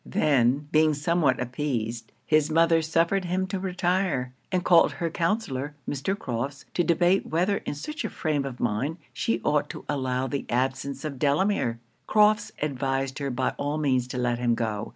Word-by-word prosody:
Then, 140 Hz, -1 st, +2 dB
being 155 Hz, -1 st, +4 dB
somewhat 150 Hz, -2 st, +1 dB
appeased, 120 Hz, -3 st, -3 dB
his 155 Hz, -1 st, +3 dB
mother 165 Hz, +1 st, +4 dB
suffered 165 Hz, +4 st, +1 dB
him 185 Hz, +2 st, 0 dB
to 190 Hz, 0 st, -3 dB
retire; 180 Hz, -8 st, 0 dB, 0.2 s
and 180 Hz, -1 st, 0 dB
called 170 Hz, -2 st, +5 dB
her 170 Hz, -1 st, -3 dB
counsellor, 155 Hz, -, -1 dB
Mr. 145 Hz, +8 st, -2 dB
Crofts, 135 Hz, -, -4 dB
to 175 Hz, -, +2 dB
debate 175 Hz, +3 st, +2 dB
whether 180 Hz, +5 st, +1 dB
in -, -, -2 dB
such 305 Hz, -, -5 dB
a 220 Hz, -, -2 dB
frame 150 Hz, -4 st, -1 dB
of 135 Hz, -2 st, -6 dB
mind 120 Hz, +8 st, -1 dB, 0.2 s
she 115 Hz, 0 st, -1 dB
ought 150 Hz, -1 st, +1 dB
to -, -, -8 dB
allow 130 Hz, -2 st, -1 dB
the 135 Hz, +1 st, -3 dB
absence 135 Hz, +3 st, -1 dB
of 140 Hz, -4 st, -5 dB
Delamere? 145 Hz, -, +1 dB, 0.3 s
Crofts 210 Hz, 0 st, +4 dB
advised 135 Hz, -1 st, -1 dB
her 140 Hz, -1 st, -2 dB
by 130 Hz, 0 st, 0 dB
all 145 Hz, +2 st, -1 dB
means 130 Hz, -5 st, +1 dB
to 125 Hz, -, -5 dB
let 120 Hz, -1 st, 0 dB
him 120 Hz, -1 st, +2 dB
go. 110 Hz, -2 st, -2 dB
145 Hz, 175 wpm, -26 LUFS, 130-170 Hz, 0.3 s, called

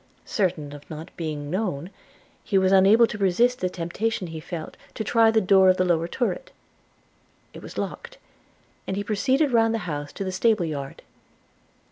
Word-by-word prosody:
Certain 170 Hz, -8 st, -1 dB
of 145 Hz, 0 st, -12 dB
not 160 Hz, +2 st, -9 dB
being 150 Hz, -3 st, -5 dB
known, 185 Hz, -4 st, -2 dB, 0.5 s
he 200 Hz, -, +1 dB
was 190 Hz, 0 st, +3 dB
unable 195 Hz, +5 st, +6 dB
to 210 Hz, -2 st, -6 dB
resist 230 Hz, +7 st, +2 dB
the 185 Hz, -, -1 dB
temptation 185 Hz, +5 st, -3 dB
he 165 Hz, -2 st, -7 dB
felt, 160 Hz, 0 st, -7 dB, 0.2 s
to 220 Hz, -, -3 dB
try 225 Hz, 0 st, +4 dB
the 220 Hz, 0 st, +3 dB
door 190 Hz, -1 st, +5 dB
of 185 Hz, -, +4 dB
the 185 Hz, -, +2 dB
lower 170 Hz, -2 st, +1 dB
turret 260 Hz, -, -2 dB, 0.5 s
– -, -, -38 dB
It -, -, -10 dB
was -, -, -10 dB
locked, -, -, -5 dB, 0.7 s
and 190 Hz, -, -2 dB
he 205 Hz, -, -1 dB
proceeded 260 Hz, +7 st, +1 dB
round 225 Hz, -1 st, +3 dB
the 220 Hz, -, -4 dB
house 145 Hz, -3 st, -4 dB
to -, -, -4 dB
the 190 Hz, -, -3 dB
stable 200 Hz, 0 st, +2 dB
yard. 140 Hz, -4 st, -6 dB
190 Hz, 180 wpm, -24 LUFS, 165-225 Hz, 0.7 s, unable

